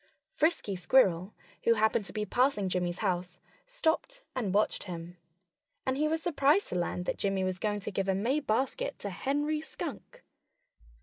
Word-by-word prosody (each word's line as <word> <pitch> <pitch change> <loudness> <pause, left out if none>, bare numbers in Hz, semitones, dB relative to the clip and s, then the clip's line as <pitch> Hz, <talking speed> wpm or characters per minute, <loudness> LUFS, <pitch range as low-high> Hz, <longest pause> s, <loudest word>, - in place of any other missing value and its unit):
Frisky 310 - +1
Squirrel, 185 -2 +3 0.3
who 230 - +5
happened 220 0 +2
to - - -7
be 210 -1 -2
passing 240 -3 +2
Jimmy's 180 -1 -1
house, 180 -1 -1 0.3
stopped - - -1
and 225 -7 -1
watched 210 +2 +1
him. 175 -1 -7 0.7
And 260 - +1
he 300 +3 +2
was 320 +1 -1
surprised 310 +2 +3
to - - -3
learn 180 0 -1
that - - -3
Jimmy 195 -1 +1
was 185 -1 -1
going 205 0 -1
to 205 - -4
give 195 0 -1
a 190 - +3
May 240 +10 +1
basket 275 - -1
to - - -4
Henry 295 +3 -1
Skunk. 310 - -7
215 Hz, 170 wpm, -30 LUFS, 185-295 Hz, 0.7 s, who